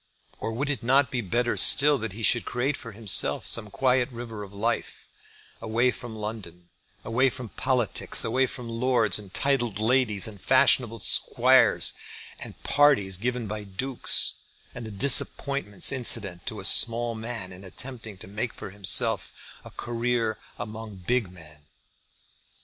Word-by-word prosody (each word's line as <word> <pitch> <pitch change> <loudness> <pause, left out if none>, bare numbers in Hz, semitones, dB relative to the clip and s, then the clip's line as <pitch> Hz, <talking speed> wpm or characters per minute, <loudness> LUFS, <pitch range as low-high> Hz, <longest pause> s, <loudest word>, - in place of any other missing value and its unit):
Or 115 - -4
would 140 +6 -2
it 140 - -4
not 130 +2 +2
be 125 - -2
better 120 +4 -1
still 145 0 +5
that 110 -4 -5
he 115 +2 -8
should 120 +2 +3
create 130 +4 -2
for 115 - -10
himself 105 -1 0
some 105 -3 +2
quiet 130 0 +1
river 115 -3 -8
of 100 -1 -9
life, 110 +4 -4 0.5
away 115 +3 +1
from 120 -2 -9
London, 105 -5 -8 0.4
away 125 +4 +2
from 125 -2 -8
politics, 120 -3 0
away 130 +3 +1
from 125 -2 -8
lords, 115 -3 0
and 100 -3 -12
titled 120 -4 -1
ladies, 110 -2 +2
and 105 -4 -10
fashionable 115 -3 +3
squares, 100 - +3 0.5
and - - -9
the - - -11
parties 135 -11 +3
given 120 +3 -3
by 105 0 -6
dukes, 120 +7 +2 0.3
and 120 -2 -8
the - - -8
disappointments 135 -1 +2
incident 110 -9 +1
to - - -4
a - - -5
small 120 0 +4
man 110 -4 -7
in 90 +2 -13
attempting 110 +3 -8
to 90 - -11
make 105 +4 -4
for 100 - -9
himself 100 -2 0 0.3
a - - -11
career 120 -2 -2 0.2
among 110 -1 -8
big 95 +2 -2
men? 75 -4 -16
115 Hz, 155 wpm, -25 LUFS, 105-125 Hz, 0.5 s, still